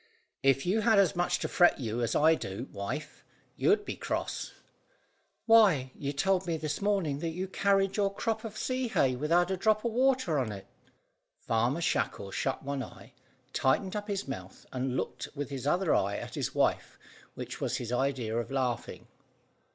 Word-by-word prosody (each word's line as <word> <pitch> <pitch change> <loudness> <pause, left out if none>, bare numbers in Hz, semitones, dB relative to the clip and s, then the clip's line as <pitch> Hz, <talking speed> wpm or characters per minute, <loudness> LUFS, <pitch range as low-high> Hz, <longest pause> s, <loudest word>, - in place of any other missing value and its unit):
"If 135 0 +3
you 195 +5 +2
had 220 -1 +4
as 195 -4 +4
much 175 0 +1
to - - -3
fret 175 -3 +4
you 115 -1 -2
as 115 -1 0
I 160 +2 +5
do, 115 -4 -4
wife, 130 +10 -5 0.3
you'd 415 0 +2
be - - -4
cross." - - -3 0.9
"Why, 195 - +5
you 140 -1 -4
told 185 +6 +1
me 165 -1 0
this 155 +1 -3
morning 195 -9 +1
that 165 +1 -2
you 185 +2 -3
carried 195 0 +1
your 200 -1 +2
crop 220 +2 -2
of 220 -2 -7
sea 255 -1 -1
hay 130 - +2
without 170 +7 +2
a 190 - 0
drop 215 +3 +2
of 235 - +1
water 250 - +2
on 120 -5 -1
it." 100 -2 -8 0.7
Farmer 120 +8 0
Shackle 100 -10 -1
shut 135 - -2
one 140 0 -3
eye, 120 - -10 0.4
tightened 185 +10 +1
up 205 0 -3
his 200 -5 -3
mouth, 95 -8 -7
and 130 0 -1
looked - - -3
with 145 -1 -4
his 135 0 -4
other 175 +2 +2
eye 100 +1 +1
at - - -7
his - - -3
wife, - - +1 0.4
which - - -7
was - - 0
his 120 -1 -5
idea 125 -3 0
of 120 0 -2
laughing. 130 -3 -2
155 Hz, 180 wpm, -30 LUFS, 130-195 Hz, 0.9 s, I